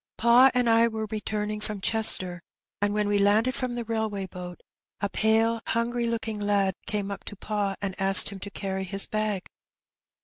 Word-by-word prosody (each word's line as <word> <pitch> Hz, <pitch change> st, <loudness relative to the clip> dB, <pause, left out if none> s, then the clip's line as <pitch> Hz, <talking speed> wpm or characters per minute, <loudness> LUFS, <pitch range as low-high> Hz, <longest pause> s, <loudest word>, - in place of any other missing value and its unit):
Pa 240 Hz, +3 st, +5 dB
and 250 Hz, -1 st, +1 dB
I 230 Hz, 0 st, +4 dB
were 220 Hz, -1 st, -5 dB
returning 210 Hz, 0 st, -4 dB
irom 210 Hz, -1 st, -5 dB
Chester, 185 Hz, -4 st, +6 dB, 0.4 s
and 205 Hz, 0 st, 0 dB
when 210 Hz, -1 st, -1 dB
we 205 Hz, 0 st, 0 dB
landed 215 Hz, +5 st, +2 dB
from 255 Hz, -2 st, -4 dB
the 240 Hz, -, -4 dB
railway 220 Hz, -3 st, -4 dB
boat, 180 Hz, -1 st, -10 dB, 0.4 s
a 200 Hz, -, -3 dB
pale 225 Hz, +2 st, 0 dB
hungry 235 Hz, +1 st, -2 dB
looking 225 Hz, -2 st, -4 dB
lad 200 Hz, -2 st, 0 dB
came 205 Hz, -1 st, -4 dB
up 200 Hz, -, -8 dB
to -, -, -8 dB
pa 205 Hz, -1 st, -3 dB
and 195 Hz, -1 st, -3 dB
asked 195 Hz, 0 st, +6 dB
him 200 Hz, -1 st, -10 dB
to 200 Hz, -, -8 dB
carry 190 Hz, -1 st, -5 dB
his 195 Hz, +1 st, 0 dB
bag. 215 Hz, -3 st, -3 dB
210 Hz, 180 wpm, -25 LUFS, 200-225 Hz, 0.4 s, Chester